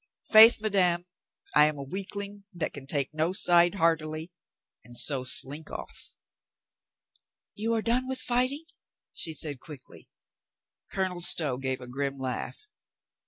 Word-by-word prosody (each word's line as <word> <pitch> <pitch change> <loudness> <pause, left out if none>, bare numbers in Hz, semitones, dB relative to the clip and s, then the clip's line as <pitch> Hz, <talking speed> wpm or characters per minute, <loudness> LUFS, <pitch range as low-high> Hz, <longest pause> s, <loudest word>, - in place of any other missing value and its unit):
Faith, 220 +1 +8
madame, 180 -5 +1 0.5
I 150 0 +6
am 155 -1 -4
a 140 - -6
weak 190 +8 -4
ling 200 0 -6
that 170 -2 -3
can 135 -1 -10
take 140 -1 -1
no 160 +3 -1
side 175 -1 +4
heartily, 160 -1 -1 0.5
and 120 0 -3
so 130 +1 +3
slink 145 +4 +2
off." - - -9 1.4
"You 225 +2 -2
are 220 - -2
done 250 +2 0
with 260 0 -4
fighting?" 255 +5 -1 0.5
she 160 - -5
said 150 -3 -4
quickly. 140 -1 -13 0.8
Colonel 185 -2 -3
Stow 150 -7 +4
gave 130 -1 -4
a 125 - -9
grim 135 +2 -4
laugh. 130 - -6
165 Hz, 140 wpm, -27 LUFS, 140-200 Hz, 1.4 s, Faith